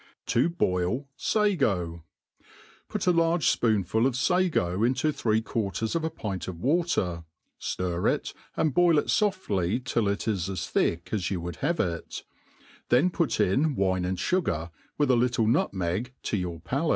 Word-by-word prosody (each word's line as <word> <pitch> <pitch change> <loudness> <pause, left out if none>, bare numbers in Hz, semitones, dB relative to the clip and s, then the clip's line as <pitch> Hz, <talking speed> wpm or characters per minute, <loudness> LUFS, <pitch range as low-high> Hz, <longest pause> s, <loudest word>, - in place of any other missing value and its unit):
To 125 +8 +3
hoil 90 +10 0
Sago., 110 - 0 0.9
PtJT - - -2
a 180 - +5
large 165 -2 +2
fpoonful 110 +1 +2
of 130 - -2
fago 130 - +1
into 130 +5 +2
three 110 -5 0
quarters 110 - -2
of 165 - 0
a 160 - 0
pint 105 - -5
of 90 -3 -6
water, 130 - 0 0.4
ftir 90 -1 0
it, - - -3 0.2
and 155 -4 +1
boil 175 -1 +4
it 145 - 0
foftly 125 - 0
till 115 -4 +1
it 100 +2 -1
is 95 -5 -1
as 95 - -3
thick 85 0 0
as 100 -5 0
you 95 - -2
would 85 0 -6
have 165 +4 -1
it; 85 -2 -3 0.7
then 140 +10 +4
put 165 -9 0
in 140 +10 +2
wine 95 -3 +1
and 90 +1 -1
fugar, 90 - -1 0.3
with 145 -3 +3
a - - +5
little 120 -1 +2
nutmeg 110 - 0
to - - -1
your 90 -4 -3
paktc. 140 - -1
115 Hz, 165 wpm, -27 LUFS, -, 0.9 s, a